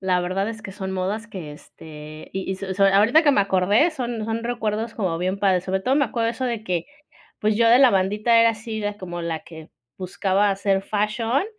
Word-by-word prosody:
La 185 -2 +1
verdad 190 +4 -2
es 220 -1 -7
que 195 -4 -8
son 190 -1 -5
modas 195 +4 -3
que, 180 -8 -8
este, 155 0 -12
y 190 0 -4
y 190 - -2
so 190 -1 -5
so, 200 0 +3
ahorita 210 +11 +5
que 295 - +5
me 270 - +3
acordé 200 - +3
son 240 -6 -4
son 225 +1 -3
recuerdos 225 -1 -3
como 185 -6 -1
bien 185 +3 -2
padres. 190 -3 +2
Sobre 190 +1 -1
todo, 255 +7 +1
me 285 - +3
acuerdo 230 -2 -1
eso 245 +3 -4
de 235 -3 -3
que, 175 -4 -2 0.5
pues, 215 0 +1
yo 230 0 +4
de 240 - +6
la 265 -2 +7
bandita 210 +4 +2
era 230 0 +5
así 220 0 -6
la 205 0 -3
como 175 -2 -6
la 165 -1 -3
que 160 -2 -12 0.3
buscaba 195 +2 0
hacer 195 0 0
fashion 225 - -1
205 Hz, 225 wpm, -23 LUFS, 185-230 Hz, 0.5 s, la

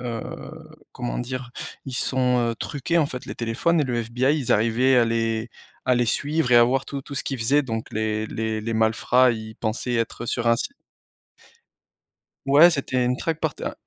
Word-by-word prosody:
heu, 120 -2 -7 0.2
comment 120 -1 -4
dire, 125 0 -5 0.3
ils 135 - -7
sont, 125 -1 +1
heu, - - -3
truqués 150 +8 -1
en 155 - +3
fait 130 -2 -7
les - - -6
téléphones 120 +9 +1
et - - +2
le 125 -3 -2
FBI, 125 +6 +1
ils 130 - -3
arrivaient 115 +4 +3
à 120 - +5
les 115 0 -1 0.3
à 125 - +3
les 120 0 +1
suivre 145 +3 0
et 120 - +7
à 120 - +8
voir 130 +2 0
tout 140 -1 -5
tout 140 +1 -9
ce - - 0
qu'ils 135 - -3
faisaient 135 +6 +3
donc 115 -4 -4
les 110 0 -1
les 110 0 -3
les 115 +1 -3
malfrats, 115 +3 +3
ils 110 -1 -6
pensaient 120 +2 -2
être 115 0 -2
sur 120 +1 -2
un 115 - +4
site 215 - -3 1.7
Ouais, 145 +5 +7
c'était 135 -5 0
une 125 +1 0
traque 165 -1 -2
par 160 -4 -1
té - - -8
heu, - - -3
125 Hz, 205 wpm, -24 LUFS, 115-135 Hz, 1.7 s, à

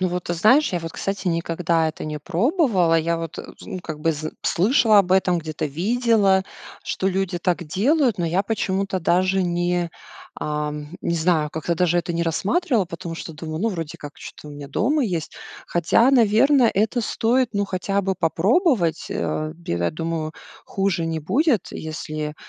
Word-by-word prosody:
Ну 185 - +1
вот, 180 0 -3
ты 175 - -2
знаешь, 250 - +4
я 175 - 0
вот, 165 0 -6
кстати, 195 -1 -3
никогда 165 -1 0
это 155 - -7
не 150 0 -4
пробовала. 190 - +2
Я 170 +1 0
вот, 165 -1 -6
э, - - -6 0.2
ну, 185 - -6
как 155 -3 -7
бы, 165 +1 +2
зн 155 +1 -5
слышала 215 +2 +4
об 185 -2 +3
этом, 185 -2 +3
где-то 155 -2 -4
видела, 200 - +2 0.4
что 190 - -2
люди 190 -1 -1
так 175 0 -1
делают, 235 - +1
но 175 - 0
я 175 +4 +1
почему-то 195 -2 -1
даже 185 +3 +2
не, 175 0 0 0.4
ам, 150 0 -3
не 170 - -1
знаю, 160 -2 +1
как-то 160 +2 -2
даже 175 0 +2
это 175 0 -2
не 170 0 -1
рассматривала, 205 - +1
потому 170 0 -7
что 165 - -7
думаю: 155 0 -6
"Ну, 225 - +1
вроде 165 -6 -5
как 145 0 -9
чё-то 150 - -10
у - - -9
меня 145 -1 -9
дома 265 - +1
есть". 170 -7 -3 0.3
Хотя, 175 +9 +3
наверное, 245 +2 +4
это 220 +5 +1
стоит, 235 +2 +1
ну, 200 -1 0
хотя 195 +1 -1
бы 190 0 0
попробовать. 180 - +1
А, 155 0 -2
бе 170 - -5
я 85 0 0
думаю, 165 -1 -3 0.3
хуже 195 -4 -1
не 160 -1 -2
будет, 255 - +1
если 155 -1 -5
175 Hz, 180 wpm, -22 LUFS, 165-205 Hz, 0.4 s, знаешь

